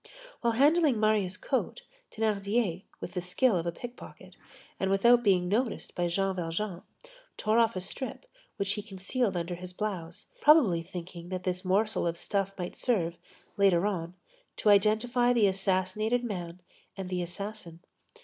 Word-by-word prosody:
While 235 -1 +1
handling 290 0 +4
Marius' 210 -3 +2
coat, - - -2 0.3
Thénardier, 205 -3 0
with - - -6
the 180 - -3
skill 190 +6 +2
of 170 -1 -1
a - - 0
pickpocket, 245 +8 -10 0.4
and 190 - 0
without 235 +5 +5
being 185 -5 +3
noticed 225 +5 -1
by 175 0 0
Jean 195 +2 0
Valjean, 175 +2 -3 0.6
tore 215 +2 +2
off 230 -2 +3
a 185 - -2
strip 260 - -5 0.3
which 200 0 0
he 210 - -2
concealed 200 +1 -2
under 170 +1 -3
his 180 +1 -8
blouse, 180 -5 -4 0.2
probably 265 - +6
thinking 175 0 -8
that 185 -1 -4
this 180 0 -2
morsel 200 +1 +1
of 170 0 -2
stuff 195 +2 -1
might 180 -1 -5
serve, 180 -9 0 0.4
later 195 -2 +4
on, 180 -4 -2 0.4
to 215 - +2
identify 220 +4 +4
the 230 -4 +4
assassinated 195 +4 +1
man 180 -6 -5 0.4
and 190 -1 -4
the 180 -1 -1
assassin. 175 -1 -7
195 Hz, 155 wpm, -29 LUFS, 180-220 Hz, 0.6 s, probably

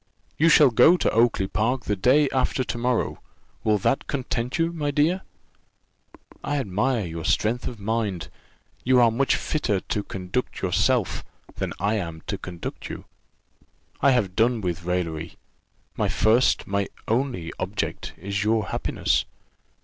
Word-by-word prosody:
You 165 +2 +4
shall 150 -4 +7
go 165 +10 +6
to - - +1
Oakly 115 -3 +3
park 115 +6 -1
the 105 - 0
day 130 +9 +4
after 130 0 +1
to 120 - -4
morrow: 125 0 0 0.4
will 110 -1 +3
that 105 - 0
content 125 -1 -2
you, 165 0 +1
my 150 -3 -2
dear? 155 +6 +2 1.2
I 145 0 -1
admire 110 0 0
your 85 -1 -6
strength 115 +8 0
of 120 - -6
mind 105 -4 -2 0.5
you 130 0 +4
are 120 -2 +5
much 135 +4 +2
fitter 115 -10 -1
to 105 - -3
conduct 95 +5 -4
yourself - - +1 0.3
than - - -2
I 105 +2 +1
am 85 -5 -5
to 100 - -4
conduct 90 -2 -7
you. - - -7 1.0
I 140 - +5
have 110 -8 +1
done 115 +1 +3
with 90 -2 -3
raillery: 85 -2 -3 0.6
my - - 0
first, 115 +4 +3
my 100 0 -1 0.2
only 115 -8 -1
object, 95 +3 -3
is 100 +2 -2
your 110 -2 +1
happiness. - - 0
110 Hz, 150 wpm, -24 LUFS, 95-130 Hz, 1.2 s, shall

